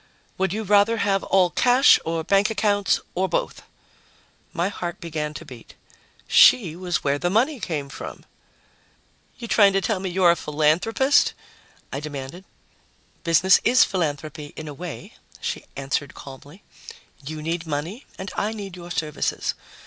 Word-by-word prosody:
"Would 190 -2 +1
you 220 +3 -3
rather 205 +3 +3
have 195 -3 +1
all 185 -2 +3
cash 250 +2 +5
or 165 0 -2
bank 195 +5 +3
accounts 205 -2 +1
or 190 +1 -1
both?" - - -2 0.9
My 175 0 -1
heart 175 -1 -5
began 155 -4 -4
to - - -8
beat. 120 -3 -13 0.5
She 180 -10 +6
was 180 -1 -2
where 140 0 0
the 175 - 0
money 250 - +1
came 150 -8 -3
from! 140 - -9 1.1
"You 235 - -7
trying 200 -3 +5
to 195 - +3
tell 205 0 -1
me 190 0 -3
you're 180 -1 +4
a - - +2
philanthropist?" 165 - +2 0.6
I 135 - -2
demanded. 150 +4 -7 0.8
"Business 175 +3 +5
is 250 +2 +5
philanthropy, 150 -3 -3
in 155 - -7
a 150 - -6
way," 170 +3 -8 0.3
she - - -4
answered 140 +1 -3
calmly. 140 +7 -12 0.6
"You 155 +2 -6
need 165 +1 -3
money 160 - -4
and 190 0 -6
I 215 +2 -1
need 200 -4 -7
your 175 -1 -10
services. 155 -3 -2
175 Hz, 150 wpm, -23 LUFS, 155-200 Hz, 1.1 s, She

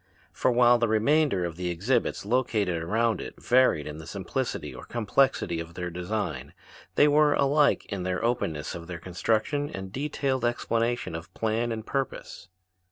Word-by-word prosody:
For - - +1
while 120 0 +5
the 115 - +2
remainder 110 - +2
of 85 -1 -5
the 90 -1 -2
exhibits 100 +7 0
located 105 -7 0
around 110 +5 +1
it - - -8
varied 125 - +3
in 75 0 -7
the 80 - -10
simplicity - - -3
or - - -10
complexity 120 -5 +1
of 85 0 -7
their 90 -1 -4
design, 90 -7 -4 0.4
they 145 - +6
were 150 0 +4
alike 145 +1 +3
in 100 -2 -4
the 90 0 -1
openness 85 -11 -1
of 85 -1 -8
their 90 -1 -5
construction 110 - -1
and 95 0 -7
detailed 135 -1 -1
explanation 120 -2 0
of 85 +3 -7
plan 115 +1 0
and 110 -1 -4
purpose. 135 -7 -4
110 Hz, 165 wpm, -27 LUFS, 90-125 Hz, 0.4 s, they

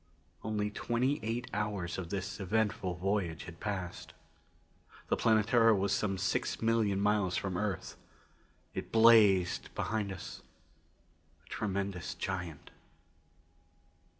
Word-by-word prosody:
Only 105 -1 -1
twenty 125 +6 0
eight 115 +3 -2
hours 100 -4 -2
of 85 -3 -5
this 95 +1 -4
eventful 100 -2 0
voyage 90 -3 -1
had 85 -2 -10
passed. 95 -4 -4 1.0
The - - +3
Planetara 115 +1 +4
was 100 0 +1
some 100 -2 0
six - - -1
million 110 -3 +2
miles 100 -3 +2
from 95 -1 -2
the 90 - -2
Earth; 105 -3 -3 0.8
it - - -5
blazed 105 -6 +5
behind 105 -3 -1
us, 95 - -8 1.0
a - - -21
tremendous 100 -3 -3
giant. 90 -5 -5
100 Hz, 115 wpm, -32 LUFS, 95-110 Hz, 1.0 s, blazed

